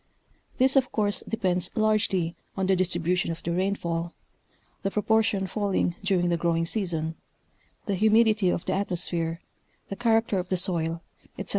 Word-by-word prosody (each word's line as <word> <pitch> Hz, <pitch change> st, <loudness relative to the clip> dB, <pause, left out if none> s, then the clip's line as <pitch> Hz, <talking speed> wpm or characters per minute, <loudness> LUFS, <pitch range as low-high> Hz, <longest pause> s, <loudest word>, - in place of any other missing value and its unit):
This 265 Hz, +2 st, +4 dB
of 260 Hz, -2 st, +3 dB
course 205 Hz, -2 st, 0 dB
depends 185 Hz, -5 st, 0 dB
largely 210 Hz, -6 st, +1 dB, 0.2 s
on 190 Hz, -, +1 dB
the 190 Hz, 0 st, +3 dB
distribution 180 Hz, -1 st, 0 dB
of 165 Hz, 0 st, -5 dB
the 170 Hz, -, -2 dB
rainfall, 170 Hz, -2 st, -1 dB, 0.7 s
the 195 Hz, -, 0 dB
proportion 210 Hz, -1 st, +1 dB
falling 195 Hz, -3 st, 0 dB
during 185 Hz, -3 st, +2 dB
the 170 Hz, -, +1 dB
growing 165 Hz, 0 st, +1 dB
season, 165 Hz, -5 st, -2 dB, 0.7 s
the 200 Hz, -, -1 dB
humidity 215 Hz, 0 st, +4 dB
of 175 Hz, -, -1 dB
the -, -, 0 dB
atmosphere, 175 Hz, -3 st, -1 dB, 0.5 s
the 195 Hz, -, -4 dB
character 225 Hz, -3 st, +2 dB
of 180 Hz, 0 st, -5 dB
the 185 Hz, -, +1 dB
soil, 170 Hz, -2 st, -1 dB, 0.3 s
ete. -, -, -6 dB
185 Hz, 150 wpm, -26 LUFS, 170-210 Hz, 0.7 s, This